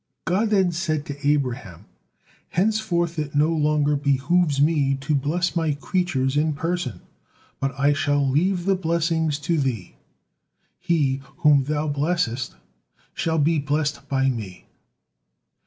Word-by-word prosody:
God 190 +5 +1
then 190 -4 +3
said 160 -3 -2
to 145 0 -5
Abraham: 125 - -2 0.6
"Henceforth 175 -4 0
it 150 -1 -4
no 150 +2 +3
longer 150 -2 +2
behooves 140 +2 +1
Me 145 -2 +2
to 135 +3 -2
bless 155 +7 0
My 160 -3 +1
creatures 145 -3 -1
in 155 +1 +2
person, 155 - -3 0.6
but 135 0 -1
I 145 +1 +4
shall 145 -1 +1
leave 175 +6 +1
the 195 - +3
blessings 165 -3 0
to 165 +2 0
thee: 120 -10 -2 0.9
he 155 -7 0 0.2
whom 145 -3 +6
thou 150 +1 -1
blessest, 145 -4 -1 0.6
shall 160 -1 -1
be 155 +1 +2
blessed 145 0 -2
by 135 -1 +1
Me." 105 -7 -7
150 Hz, 130 wpm, -23 LUFS, 140-170 Hz, 0.9 s, whom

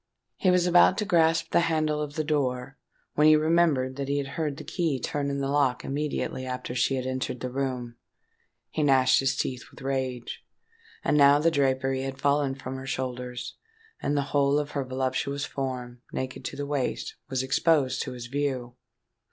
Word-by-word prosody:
He 185 - +2
was 180 -1 +4
about 180 +1 +5
to 210 - 0
grasp 165 -2 +3
the - - +4
handle 155 -1 +1
of 150 0 -5
the 155 - 0
door, 135 -4 -1 0.4
when 150 +1 +4
he 155 - +8
remembered 155 -5 +2
that 140 -1 -3
he 140 +1 0
had 140 -1 -2
heard 150 -1 -2
the 155 - -7
key 160 -7 -1
turn 140 +1 -2
in 140 0 -2
the 135 - -1
lock 140 -3 +1
immediately 145 -2 -2
after 125 -1 -4
she 130 +2 +1
had 130 -1 -2
entered 130 -1 -3
the 125 - -4
room. 125 -3 -3 0.7
He - - -1
gnashed 135 -3 +5
his 135 0 +1
teeth 125 -3 -2
with - - -14
rage. 130 -3 -3 0.6
And 150 - +2
now 140 0 +7
the 165 +3 +3
drapery 135 -2 +1
had 135 0 -4
fallen 140 -1 +2
from 130 -1 -6
her 130 0 -8
shoulders, 125 -2 -4 0.4
and 145 +1 0
the 140 - +2
whole 140 0 +3
of 150 0 -2
her 140 -2 -1
voluptuous 130 +2 -2
form, 125 -2 -5
naked 130 0 -4
to - - -4
the 145 - -3
waist, 140 -3 -2
was 130 -1 -1
exposed 135 -1 +2
to 130 - -4
his 120 -1 -7
view. 130 -2 -3
135 Hz, 190 wpm, -27 LUFS, 130-150 Hz, 0.7 s, he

